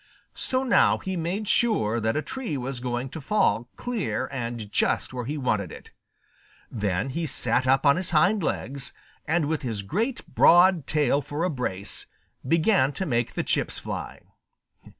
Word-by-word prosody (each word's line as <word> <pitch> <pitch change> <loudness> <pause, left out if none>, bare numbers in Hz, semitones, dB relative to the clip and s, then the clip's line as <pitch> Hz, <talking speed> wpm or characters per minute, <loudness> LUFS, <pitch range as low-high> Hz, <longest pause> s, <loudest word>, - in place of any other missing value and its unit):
So 260 0 0
now 255 - +4
he 190 0 -4
made 180 +5 -2
sure 190 - +2
that 110 +4 0
a 155 - -1
tree 230 - -4
was 130 0 -3
going 125 +1 -3
to 160 - -7
fall 120 - +1
clear 240 -5 -2
and 120 -5 -5
just - - 0
where 125 -2 -4
he 150 +5 -3
wanted 105 - -1
it. - - -12 0.8
Then 105 +2 -1
he 165 +3 -2
sat 125 -1 +1
up 135 +2 +3
on 140 +1 +5
his 185 -1 -2
hind 180 +6 +3
legs, 140 -4 -3 0.3
and 160 -1 +2
with 155 +1 -1
his 115 -7 -3
great 225 - -2
broad 175 -3 +5
tail 145 -2 +2
for 145 +3 -4
a 180 - +1
brace, 100 -8 -4 0.4
began 160 0 +3
to 190 - -3
make 120 -5 -1
the - - -1
chips - - 0
fly. - - -6
140 Hz, 170 wpm, -26 LUFS, 120-175 Hz, 0.8 s, on